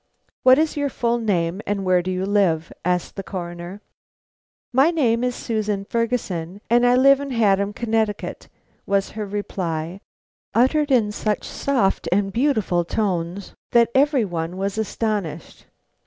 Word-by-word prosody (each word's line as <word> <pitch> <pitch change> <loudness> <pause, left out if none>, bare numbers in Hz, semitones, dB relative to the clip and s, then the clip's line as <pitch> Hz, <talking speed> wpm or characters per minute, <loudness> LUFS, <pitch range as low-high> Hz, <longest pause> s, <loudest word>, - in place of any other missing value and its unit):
"What 255 0 +7
is 315 0 +1
your 285 -1 0
full 235 -2 0
name, 185 -4 0
and 200 -1 -1
where 180 -1 +3
do 180 - -4
you 185 0 -1
live?" 185 -6 +1
asked 180 0 -1
the - - -2
Coroner. 175 0 -7 0.9
"My 270 +5 +5
name 250 -8 +1
is 250 0 0
Susan 210 -3 -2
Ferguson, 205 -7 -2
and 240 +1 +5
I 245 - +5
live 275 +2 +6
in 280 0 -5
Haddam, 200 -5 +2
Connecticut," 220 -2 -2 0.4
was 195 -1 +1
her 215 -1 -5
reply, 185 -3 -4 0.5
uttered 285 +6 +3
in 230 -6 +3
such 210 0 -2
soft 200 -11 0
and 195 +1 +1
beautiful 220 -9 +1
tones 180 -1 -2 0.2
that 235 -1 +5
every 275 -3 +3
one 170 -1 -4
was 195 +2 -2
astonished. 205 -7 -3
205 Hz, 145 wpm, -22 LUFS, 185-240 Hz, 0.9 s, What